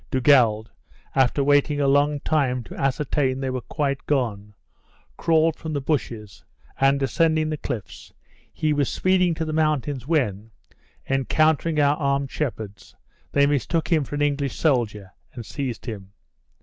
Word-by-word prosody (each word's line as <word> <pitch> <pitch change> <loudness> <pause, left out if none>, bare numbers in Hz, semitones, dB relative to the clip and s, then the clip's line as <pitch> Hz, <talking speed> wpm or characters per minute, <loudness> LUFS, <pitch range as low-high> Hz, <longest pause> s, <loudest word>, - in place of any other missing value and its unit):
Dugald, 120 -5 +3 0.4
after 135 +1 +2
waiting 145 +1 +2
a 140 - +2
long 145 +1 +2
time 130 -6 0
to - - -11
ascertain 135 -1 0
they 135 -1 -2
were 130 -1 -3
quite 140 -1 -2
gone, 105 -7 -1 0.6
crawled 160 -1 +2
from 160 -1 -6
the 145 - 0
bushes, 120 - -3 0.4
and, 135 0 +3
ascending 155 +3 +1
the 155 - -2
cliffs, 120 -8 -7 0.4
he 155 -1 0
was 145 -3 0
speeding 185 -2 +2
to 160 - -3
the 155 - -4
mountains, 150 -4 0
when, 110 - 0 0.6
encountering 155 +4 +1
our 145 0 +3
armed 140 -2 -1
shepherds, 110 -8 -5 0.4
they 140 0 +4
mistook 145 +3 0
him 160 -3 +3
for 145 - -6
an 145 - 0
English 140 -2 -1
soldier, 110 - 0 0.2
and 120 -3 -7
seized 130 -3 -5
him. 100 -5 -7
140 Hz, 150 wpm, -23 LUFS, 125-150 Hz, 0.6 s, they